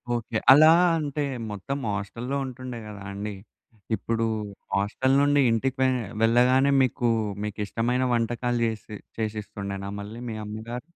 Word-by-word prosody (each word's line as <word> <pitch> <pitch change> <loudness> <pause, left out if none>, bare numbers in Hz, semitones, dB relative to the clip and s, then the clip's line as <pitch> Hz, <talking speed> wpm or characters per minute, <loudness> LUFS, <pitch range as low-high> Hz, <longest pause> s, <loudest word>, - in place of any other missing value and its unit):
Okay. 115 -1 -2
అలా 155 +4 +9 0.3
అంటే 150 -1 -2 0.3
మొత్తం 105 +8 -4 0.2
హాస్టల్‌లో 115 +7 -4
ఉంటుండే 130 -1 -7
గదా 105 -2 -9
అండి. 105 +1 -4 0.6
ఇప్పుడు 115 0 -1 0.5
హాస్టల్ 105 +7 +1
నుండి 145 0 +4
ఇంటికి 130 +4 0
వె 130 - +5 0.3
వెళ్ళగానే 125 +4 +4
మీకు 125 -1 +1 0.4
మీకిష్టమైన 115 +4 -1
వంటకాలు 120 +1 0
జేసి 110 -1 -4 0.2
చేసిస్తుండేనా? 100 -3 -4
మళ్ళీ 105 +3 -7
మీ 110 - -4
అమ్మగారు. 110 +3 -6
115 Hz, 120 wpm, -26 LUFS, 105-130 Hz, 0.6 s, అలా